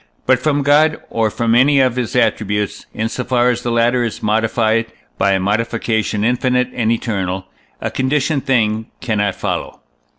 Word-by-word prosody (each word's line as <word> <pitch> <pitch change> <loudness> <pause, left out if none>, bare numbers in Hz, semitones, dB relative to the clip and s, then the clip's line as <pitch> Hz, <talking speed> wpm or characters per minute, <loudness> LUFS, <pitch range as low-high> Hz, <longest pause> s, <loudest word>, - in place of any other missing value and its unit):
But 130 -1 +3
from 145 +1 0
God, 150 +2 +4
or 110 -1 +1
from 115 +1 0
any 135 +4 +4
of 130 -2 +2
his 125 0 -3
attributes, 105 -4 0
in 110 - -2
so 125 +2 -4
far 125 -1 +2
as 120 0 -3
the 120 - -3
latter 120 +1 +2
is 115 - -4
modified 110 +1 +1 0.3
by 100 - +3
a 95 - +1
modification 110 +1 -1
infinite 125 +1 +1
and 115 -2 0
eternal, 95 -5 -2 0.3
a - - -3
conditioned 135 +2 0
thing 110 -4 +1
cannot 105 -4 -1
follow. - - -4
115 Hz, 165 wpm, -17 LUFS, 110-125 Hz, 0.3 s, God